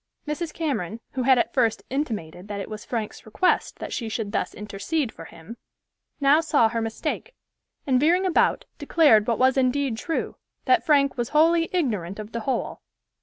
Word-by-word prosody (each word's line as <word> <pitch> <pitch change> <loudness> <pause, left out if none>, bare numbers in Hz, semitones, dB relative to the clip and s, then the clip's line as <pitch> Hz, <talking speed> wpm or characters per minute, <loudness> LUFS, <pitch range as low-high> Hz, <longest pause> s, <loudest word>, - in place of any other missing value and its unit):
Mrs. 305 +2 -3
Cameron, 235 - -3
who 260 - -3
had 260 +1 +5
at - - 0
first 230 -4 +1
intimated 210 - -4
that 205 -1 -5
it 200 - -6
was 215 0 -6
Frank's 225 -3 -4
request 220 +12 0
that - - -6
she 230 -3 -3
should 215 -2 -3
thus - - -2
intercede 220 +7 -3
for 165 - -11
him, 165 +9 -12 0.6
now 285 +2 +5
saw 300 -8 +3
her 230 0 -2
mistake, 225 - -4 0.5
and 260 -4 +3
veering 345 +7 +3
about, 365 - +2
declared 225 -11 +4
what 235 - +1
was 260 +1 +3
indeed 260 -2 +1
true, 325 - -3 0.3
that 375 -2 +4
Frank 280 -4 +3
was 235 - -1
wholly 330 +2 +3
ignorant 210 - -1
of 215 0 -8
the 235 - -3
whole. 255 +4 -3
255 Hz, 175 wpm, -24 LUFS, 220-300 Hz, 0.6 s, had